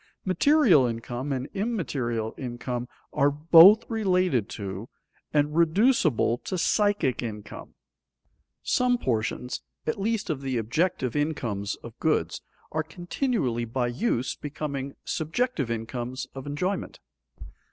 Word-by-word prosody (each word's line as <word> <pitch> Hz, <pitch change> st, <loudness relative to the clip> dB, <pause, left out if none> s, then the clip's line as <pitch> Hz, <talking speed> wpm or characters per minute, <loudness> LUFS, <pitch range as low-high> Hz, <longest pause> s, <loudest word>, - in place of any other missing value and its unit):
Material 190 Hz, -, +5 dB
income 120 Hz, +4 st, -4 dB
and 130 Hz, -1 st, -2 dB
immaterial 135 Hz, -, -2 dB
income 120 Hz, -1 st, -4 dB, 0.3 s
are 140 Hz, -1 st, +4 dB
both 165 Hz, +9 st, +7 dB
related 185 Hz, -, +1 dB
to 100 Hz, +2 st, -6 dB, 0.4 s
and 150 Hz, 0 st, +1 dB
reducible 165 Hz, -, +3 dB
to 185 Hz, -, -4 dB
psychic 205 Hz, -, +1 dB
income. 105 Hz, -3 st, -7 dB, 0.9 s
Some 250 Hz, 0 st, +2 dB
portions 120 Hz, -, -2 dB, 0.2 s
at 155 Hz, -, -2 dB
least 215 Hz, -3 st, 0 dB
of 140 Hz, -3 st, -3 dB
the 135 Hz, -2 st, -2 dB
objective 130 Hz, -, 0 dB
incomes 120 Hz, -10 st, -1 dB
of -, -, -11 dB
goods -, -, 0 dB, 0.3 s
are 160 Hz, -, 0 dB
continually 165 Hz, -, -2 dB
by 120 Hz, +1 st, -1 dB
use 125 Hz, -, -1 dB
becoming 140 Hz, -2 st, -5 dB
subjective 160 Hz, -, -1 dB
incomes 120 Hz, +2 st, -4 dB
of 135 Hz, +1 st, -8 dB
enjoyment. 180 Hz, +7 st, -3 dB
145 Hz, 110 wpm, -26 LUFS, 120-185 Hz, 0.9 s, both